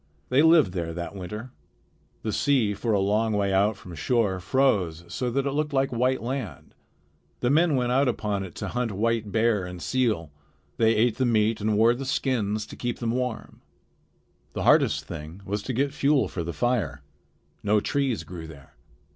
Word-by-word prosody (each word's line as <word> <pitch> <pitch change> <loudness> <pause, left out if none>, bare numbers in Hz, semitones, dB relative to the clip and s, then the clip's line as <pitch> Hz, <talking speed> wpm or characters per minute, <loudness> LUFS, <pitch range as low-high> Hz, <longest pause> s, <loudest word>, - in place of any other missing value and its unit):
They 135 - +4
lived 160 - +5
there 85 -3 -3
that 85 +1 -5
winter. 105 +6 -7 0.7
The 110 - -2
sea 130 -8 +2
for 115 +3 -2
a 105 - +3
long 105 +3 +1
way 100 -1 +1
out 100 +2 +2
from 90 - -11
shore 95 - 0
froze 90 -8 +1
so 125 +8 -2
that 135 +3 -1
it 140 - 0
looked 150 +1 -1
like 135 -1 +1
white 125 +1 0
land. 125 -4 -5 0.7
The 125 - +2
men 160 0 +4
went 125 -1 0
out 135 +2 +3
upon 105 -5 -1
it 90 -3 -9
to - - -4
hunt 125 -2 -2
white 110 +1 0
bear 110 -3 +2
and 90 0 -7
seal. 110 - 0 0.5
They 115 0 +3
ate 110 +1 +2
the 130 - +1
meat 110 -1 +2
and 105 0 +1
wore 115 +2 +5
the 135 +3 -5
skins 110 -6 -1
to - - -11
keep 120 -1 -3
them 115 -2 -2
warm. 125 -1 -4 0.9
The - - -3
hardest - - +4
thing 80 +6 -8
was 105 +1 -2
to 105 - -4
get 135 +3 0
fuel 140 -1 +2
for 85 - -4
the 85 - -4
fire. 85 - -1 0.6
No 105 +1 +3
trees 135 +1 -1
grew 85 -3 -8
there. 70 -4 -14
110 Hz, 190 wpm, -26 LUFS, 95-130 Hz, 0.9 s, lived